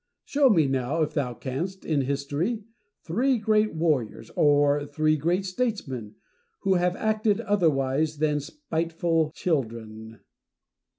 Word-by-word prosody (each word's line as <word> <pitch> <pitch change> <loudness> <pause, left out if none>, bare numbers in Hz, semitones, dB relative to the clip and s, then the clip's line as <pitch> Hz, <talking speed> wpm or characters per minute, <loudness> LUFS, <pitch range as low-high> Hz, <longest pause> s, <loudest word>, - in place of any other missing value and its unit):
Show 280 -1 +3
me 165 -9 +4
now, 135 +4 0
if 150 0 -3
thou 125 -5 -1
canst, 170 - -5
in 150 -3 +1
history, 145 - -2 0.4
three 245 +10 +1
great 215 -2 +2
warriors, 155 -9 -1
or 145 0 +3
three 155 +1 +1
great 175 +6 0
statesmen, 185 - -3 0.5
who 195 - +2
have 180 0 +1
acted 215 -1 +1
otherwise 155 -5 +1
than 150 0 +1
spiteful 165 - -1
children. 110 - -3
155 Hz, 120 wpm, -26 LUFS, 140-190 Hz, 0.5 s, me